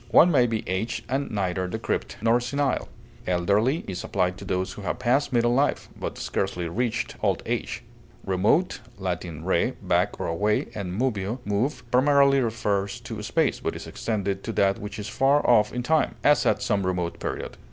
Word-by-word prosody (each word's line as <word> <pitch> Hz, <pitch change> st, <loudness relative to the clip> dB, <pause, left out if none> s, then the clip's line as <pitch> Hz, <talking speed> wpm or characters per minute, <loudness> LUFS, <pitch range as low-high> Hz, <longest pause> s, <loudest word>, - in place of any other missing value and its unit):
One 175 Hz, -, +7 dB
may 125 Hz, -5 st, +4 dB
be 110 Hz, -1 st, -3 dB
aged 95 Hz, +5 st, -2 dB
and 135 Hz, +2 st, -1 dB
neither 95 Hz, -3 st, -1 dB
decrepit 90 Hz, -, -3 dB
nor 115 Hz, +1 st, +4 dB
senile. 135 Hz, +2 st, -1 dB, 0.4 s
Elderly 100 Hz, -, +2 dB
is 95 Hz, -2 st, -4 dB
applied 90 Hz, -2 st, 0 dB
to -, -, -8 dB
those 95 Hz, 0 st, -1 dB
who -, -, -9 dB
have 100 Hz, -, -2 dB
passed 130 Hz, +4 st, +1 dB
middle 120 Hz, -1 st, +3 dB
life, 140 Hz, +3 st, +1 dB
but -, -, -5 dB
scarcely 90 Hz, -3 st, -2 dB
reached 115 Hz, +7 st, -2 dB
old -, -, +1 dB
age. -, -, -3 dB, 0.4 s
Remote 95 Hz, -, +2 dB, 0.2 s
(L. 95 Hz, -2 st, 0 dB, 0.3 s
re, 90 Hz, -1 st, +1 dB
back -, -, 0 dB
or -, -, -2 dB
away, 105 Hz, +6 st, 0 dB
and 100 Hz, -4 st, -4 dB
moveo, 110 Hz, -3 st, -1 dB
move), 125 Hz, +6 st, -1 dB
primarily 140 Hz, +1 st, +5 dB
refers 110 Hz, -1 st, -1 dB
to 110 Hz, -2 st, -6 dB
space, 155 Hz, +8 st, +1 dB
but -, -, -3 dB
is -, -, -7 dB
extended 100 Hz, -3 st, -2 dB
to -, -, -3 dB
that 100 Hz, 0 st, +2 dB
which 105 Hz, +1 st, -6 dB
is 105 Hz, -1 st, -5 dB
far 135 Hz, +7 st, +2 dB
off 105 Hz, -3 st, +5 dB
in 125 Hz, 0 st, -3 dB
time; 160 Hz, +4 st, +2 dB
as, 145 Hz, 0 st, +4 dB
at -, -, +2 dB
some 100 Hz, -5 st, +1 dB
remote 90 Hz, -2 st, -2 dB
period. -, -, -4 dB
110 Hz, 180 wpm, -25 LUFS, 95-125 Hz, 0.4 s, One